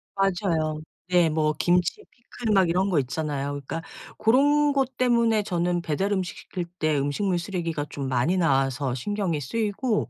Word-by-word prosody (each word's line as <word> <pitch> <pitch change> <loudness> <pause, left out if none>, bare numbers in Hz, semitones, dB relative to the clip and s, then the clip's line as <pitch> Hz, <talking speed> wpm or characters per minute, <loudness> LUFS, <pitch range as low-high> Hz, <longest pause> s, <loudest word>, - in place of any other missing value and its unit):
맞아요. 175 -5 0 0.3
네. 175 -2 +4
뭐 155 0 +1
김치, 180 - +2
피클 235 -2 -4
막 190 -3 +4
이런 190 +3 +1
것 165 -6 +2
있잖아요. 140 +1 -3
그러니까 145 +3 -5 0.4
고런 290 +5 +4
것 265 -2 0
때문에 235 -4 +3
저는 175 -2 0
배달 175 +6 -1
음식 185 -2 -2
시킬 180 -2 -5 0.2
때 155 -2 +1
음식물 175 +7 0
쓰레기가 170 -5 -3
좀 140 -2 -4
많이 130 +9 +1
나와서 135 -4 +1
신경이 180 - -2
쓰이고 215 - -1
175 Hz, 325 characters per minute, -25 LUFS, 155-205 Hz, 0.4 s, 네